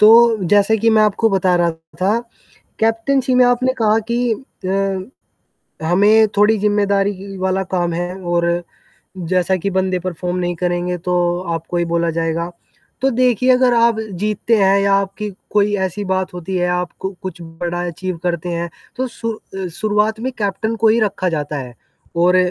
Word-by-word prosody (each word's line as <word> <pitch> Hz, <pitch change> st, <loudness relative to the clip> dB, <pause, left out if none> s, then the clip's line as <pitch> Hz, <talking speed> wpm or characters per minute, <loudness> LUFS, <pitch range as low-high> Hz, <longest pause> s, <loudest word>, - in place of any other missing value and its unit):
तो 225 Hz, +1 st, +7 dB
जैसे 205 Hz, +2 st, +4 dB
कि 225 Hz, +2 st, +3 dB
मैं 220 Hz, -1 st, +5 dB
आपको 215 Hz, +2 st, +2 dB
बता 185 Hz, -2 st, +2 dB
रहा 170 Hz, -1 st, +2 dB, 0.3 s
था 200 Hz, +5 st, +2 dB, 0.6 s
कैप्टैन्सी 245 Hz, +4 st, +1 dB
में 250 Hz, 0 st, +6 dB
आपने 255 Hz, +1 st, +2 dB
कहा 215 Hz, 0 st, +4 dB
कि 240 Hz, 0 st, +1 dB
अ, 195 Hz, -1 st, -4 dB, 0.6 s
हमें 210 Hz, +5 st, +5 dB
थोड़ी 210 Hz, +2 st, +4 dB
ज़िम्मेदारी 200 Hz, -1 st, +2 dB
ही 195 Hz, +1 st, -9 dB
वाला 190 Hz, +1 st, 0 dB
काम 175 Hz, -2 st, 0 dB
है 175 Hz, +2 st, -3 dB
और 175 Hz, -1 st, 0 dB, 0.8 s
जैसा 185 Hz, +1 st, +2 dB
कि 200 Hz, +3 st, -2 dB
बंदे 185 Hz, -1 st, 0 dB
परफ़ॉर्म 180 Hz, 0 st, -3 dB
नहीं 175 Hz, -1 st, -1 dB
करेंगे, 175 Hz, +1 st, -1 dB
तो 175 Hz, 0 st, 0 dB
आपको 170 Hz, -1 st, -3 dB
ही 170 Hz, -, +1 dB
बोला 170 Hz, 0 st, 0 dB
जाएगा। 165 Hz, +1 st, -2 dB, 0.5 s
तो 270 Hz, -, +3 dB
देखिए 250 Hz, 0 st, +3 dB
अगर 250 Hz, -1 st, +3 dB
आप 230 Hz, -1 st, +3 dB, 0.2 s
जीतते 215 Hz, +2 st, +1 dB
हैं 195 Hz, -1 st, +4 dB
या 200 Hz, 0 st, +2 dB
आपकी 195 Hz, +2 st, -1 dB, 0.2 s
कोई 205 Hz, 0 st, +2 dB
ऐसी 205 Hz, +3 st, -6 dB
बात 190 Hz, -1 st, -1 dB
होती 180 Hz, +2 st, -5 dB
है, 180 Hz, 0 st, +1 dB
आपको 180 Hz, +2 st, -3 dB
कुछ 185 Hz, -2 st, -6 dB
बड़ा 170 Hz, +1 st, -4 dB
अचीव 180 Hz, +1 st, -4 dB
करते 175 Hz, -1 st, -2 dB
हैं। 170 Hz, 0 st, -3 dB, 0.3 s
तो 260 Hz, +1 st, -2 dB
सु 230 Hz, -1 st, -4 dB, 0.2 s
अ, 190 Hz, -1 st, -3 dB
शुरुआत 210 Hz, +4 st, 0 dB
में 260 Hz, +3 st, -2 dB
कैप्टन 215 Hz, +2 st, -1 dB
को 225 Hz, 0 st, +2 dB
ही 225 Hz, +2 st, +3 dB
रखा 200 Hz, -4 st, 0 dB
जाता 150 Hz, -2 st, -3 dB
है 125 Hz, -3 st, -7 dB, 0.4 s
और 175 Hz, +2 st, +4 dB
195 Hz, 170 wpm, -18 LUFS, 175-220 Hz, 0.8 s, तो